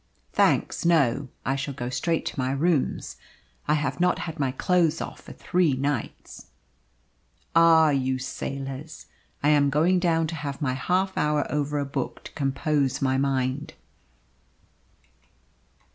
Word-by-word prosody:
"Thanks, - - +2
no. 140 -5 +2 0.2
I 135 - +1
shall 140 0 -4
go 120 -2 -4
straight 165 +5 -1
to - - -4
my 130 0 0
rooms. 150 0 0 0.5
I 150 - +3
have 150 +2 -2
not 180 0 +3
had 160 -2 -6
my 135 -2 +1
clothes 170 +3 +1
off - - -6
for - - -12
three 175 -5 +1
nights." 135 -2 -4 1.1
"Ah, 165 -2 +6
you 130 -1 0
sailors! 135 +3 -6 0.4
I 145 - +4
am 145 -2 +4
going 165 +6 +3
down 165 -2 +2
to 160 +1 -4
have 145 -3 -5
my 135 -5 0
half 185 +8 0
hour 150 -1 +1
over 150 0 -1
a 145 - -1
book 135 -2 -4
to - - -10
compose 140 -1 0
my 130 -1 +1
mind." 135 +1 -1
145 Hz, 145 wpm, -25 LUFS, 135-160 Hz, 1.1 s, Ah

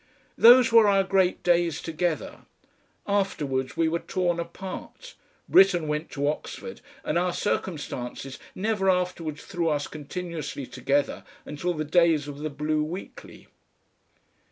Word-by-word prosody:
Those 245 +1 +7
were 230 -2 +7
our 195 -1 +4
great 190 -1 +1
days 175 -3 +2
together. 165 -1 -3 0.6
Afterwards 150 -10 -1
we 165 -1 +3
were 170 +1 0
torn 175 -2 -1
apart; 190 - -8 0.3
Britten 180 -5 +5
went 150 +2 -2
to 145 -1 -2
Oxford, 155 +9 -5 0.2
and 170 - 0
our 180 0 0
circumstances 135 -9 -4 0.2
never 205 -1 0
afterwards 180 -4 -1
threw 175 -4 -1
us 145 -1 0
continuously 155 -2 -6
together 140 +3 -1 0.2
until 175 +4 -3
the 155 0 -3
days 160 -2 +3
of 145 -1 -7
the 155 +1 -3
BLUE 150 +1 -1
WEEKLY. 175 +5 -8
170 Hz, 130 wpm, -26 LUFS, 150-185 Hz, 0.6 s, Those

